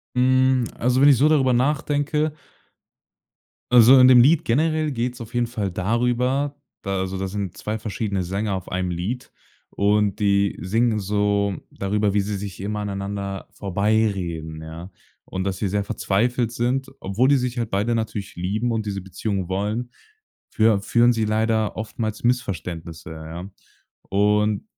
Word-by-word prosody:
Hm, 130 0 +3
also 125 +2 +1
wenn 145 - +7
ich 135 - +6
so 150 +3 +4
darüber 135 -5 +3
nachdenke 145 +3 0 1.4
Also 125 +2 +8
in 130 0 +8
dem 125 - +8
Lied 155 +6 +5
generell 155 +4 +1
geht's 125 -1 -3
auf 115 +1 -9
jeden 120 -1 +1
Fall 105 -6 -3
darüber, 125 +8 0 0.2
da 100 -2 -2
also 95 0 -3
da 95 - -2
sind 95 -2 -4
2 110 +1 -4
verschiedene 105 -3 -2
Sänger 100 +3 -2
auf 95 - -6
einem 90 0 -2
Lied. 95 +9 -4 0.4
Und 105 0 +1
die 100 -1 +2
singen 110 +5 +1
so 100 0 0 0.2
darüber, 100 +1 0
wie 105 - +2
sie 100 +1 -2
sich 100 -1 -6
immer 105 +2 -3
aneinander 100 -1 -4
vorbeireden, 95 -6 -1
ja. 80 +4 -9 0.3
Und 95 0 -4
dass 95 -1 -2
sie 100 - -1
sehr 100 +1 -1
verzweifelt 115 +4 0
sind, 130 +3 -1
obwohl 110 +8 +1
die 140 - +5
sich 125 -1 -2
halt 115 -2 -2
beide 105 +4 +1
natürlich 105 -2 -4
lieben 105 +7 -1
und 110 -1 -2
diese 100 -1 -3
Beziehung 95 0 -3
wollen, 105 +6 -2 0.6
führ 110 -2 +3
führen 120 +3 +3
sie 115 -1 -1
leider 110 0 0
oftmals 110 0 -4
Missverständnisse, 85 -9 -3
ja. 80 +4 -8 0.6
Und 105 - +2
105 Hz, 155 wpm, -23 LUFS, 100-120 Hz, 1.4 s, Also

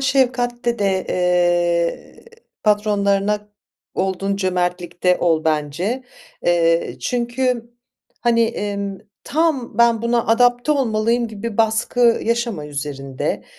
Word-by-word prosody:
şefkatte 245 -3 +1
de, 195 -2 0
eee, 175 - 0 0.4
patronlarına 210 0 +1 0.5
olduğun 195 +1 -1
cömertlikte 180 -1 0
ol 160 -2 +1
bence. 160 - -1 0.4
Eee, 165 -1 +2
çünkü, 240 -1 -1 0.5
hani, 235 -1 +3
emm, 200 -3 -3 0.3
tam 300 -7 0
"Ben, 235 -1 +4
buna 235 0 +1
adapte 245 +4 +3
olmalıyım." 235 -2 +1
gibi 220 0 -6
baskı 225 +1 +2
yaşama 230 -9 -1
üzerinde. 140 -2 -4
210 Hz, 95 wpm, -20 LUFS, 180-235 Hz, 0.5 s, Ben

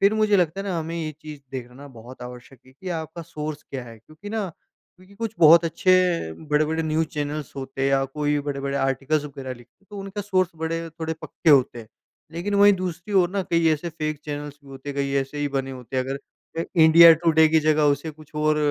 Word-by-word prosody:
फिर 200 +2 +4
मुझे 215 -1 +3
लगता 180 +1 +1
है 200 - -6
ना, 180 -3 -1
हमें 165 +1 -4
ये 155 -2 -3
चीज़ 150 -2 -9
देखना 130 +2 -8
बहुत 125 +1 -12
आवश्यक 125 +1 -11
है 130 - -18
कि 180 +8 -9
आपका 165 0 -5
सोर्स 155 -2 -6
क्या 130 -3 -7
है, 115 -1 -12
क्योंकि 155 - -13
ना 215 -4 -2 0.5
क्योंकि 185 +2 -19
कुछ 225 +1 -4
बहुत 165 +1 +7
अच्छे 185 +3 +2 0.6
बड़े-बड़े 155 +2 +1
न्यूज़ 160 0 0
चैनल्स 150 -1 -4
होते 135 0 -5
हैं 135 - +3
या 135 0 +2
कोई 145 +2 -1
बड़े-बड़े 140 -1 -3
आर्टिकल्स 140 +3 0
वगैरह 135 -2 -7
लिखते 120 0 -19
हैं, - - -30
तो 205 - -8
उनका 195 +1 -5
सोर्स 185 -3 +1
बड़े 165 +1 -3
थोड़े 160 0 -4
पक्के 160 - 0
होते 130 -4 +4
हैं। 110 -2 -10 0.4
लेकिन 175 +5 -3
वहीं 205 0 +7
दूसरी 185 +2 -5
ओर 180 -2 +4
ना 200 0 -1
कई 170 -1 +3
ऐसे 155 +3 -3
फेक 155 -2 -4
चैनल्स 145 -1 -6
भी - - -15
होते 135 +1 -10
हैं। 140 - -5
कई 140 -1 -1
ऐसे 135 +2 -6
ही 145 - 0
बने 135 -1 -2
होते 130 0 -7
हैं। 130 - +1
अगर 135 +1 -4 0.4
अ, 165 - 0
इंडिया 165 +1 +9
टुडे 160 -1 +6
की 160 0 +3
जगह 155 0 +2
उसे 160 +3 -4
कुछ 155 0 -17
और 155 0 +2
155 Hz, 225 wpm, -24 LUFS, 140-170 Hz, 0.6 s, इंडिया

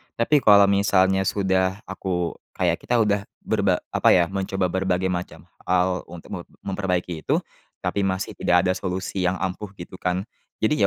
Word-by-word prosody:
Tapi 145 +6 +3
kalau 100 -5 +7
misalnya 95 -1 +3
sudah 95 0 0
aku, 90 -3 -2 0.2
kayak - - +1
kita 120 - -1
udah 105 -3 +2 0.2
berba - - +2 0.2
apa, - - +4
ya, 85 0 +2
mencoba 95 -2 -1
berbagai 95 0 0
macam 90 0 -5 0.2
hal 90 0 +2
untuk 85 0 -11
me - - -4 0.2
memperbaiki 90 -4 -2
itu, - - 0 0.4
tapi 100 -1 0
masih 95 0 -2
tidak 90 0 +3
ada 90 - +2
solusi 95 0 -2
yang 90 - +1
ampuh, 95 +3 -3
gitu, 90 0 -10
kan. 90 +1 -1 0.4
Jadi 150 +8 +2
95 Hz, 160 wpm, -24 LUFS, 90-100 Hz, 0.4 s, kalau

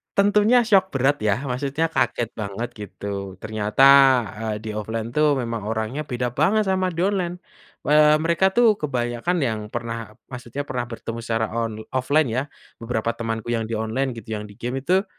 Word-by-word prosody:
Tentunya 210 +4 +4
syok 195 -4 +4
berat 135 +1 +1
ya, 110 +6 0
maksudnya 140 +4 -1
kaget 120 -1 0
banget 105 +2 -4
gitu 100 -2 -6
ternyata, 110 +4 0 0.7
eee, - - -3
di 110 - -5
offline 110 +2 -4
tuh 150 -1 +3
memang 115 -3 -3
orangnya 110 +6 -2
beda 125 -1 -2
banget 195 +11 +2
sama 185 -1 +1
di 170 -1 -3
online, 185 -3 -1 0.5
eee, 150 0 +6
mereka 170 +4 +2
itu 230 +2 +4
kebanyakan 125 +4 -1
yang 110 -4 -1
pernah 115 -2 -5 0.2
maksudnya 125 +2 -5
pernah 125 -3 -3
bertemu 115 0 -6
secara 115 -1 -2
on 115 -2 -3
offline 135 +2 +2
ya, 130 +3 0 0.4
beberapa 115 0 -1
temanku 115 0 -4
yang 115 -1 -1
di 115 - -2
online 110 +5 -1
gitu 110 0 -7
yang 105 -1 -4
di 100 - -15
game 125 +3 -3
itu, 185 +7 +2
120 Hz, 170 wpm, -23 LUFS, 110-155 Hz, 0.7 s, eee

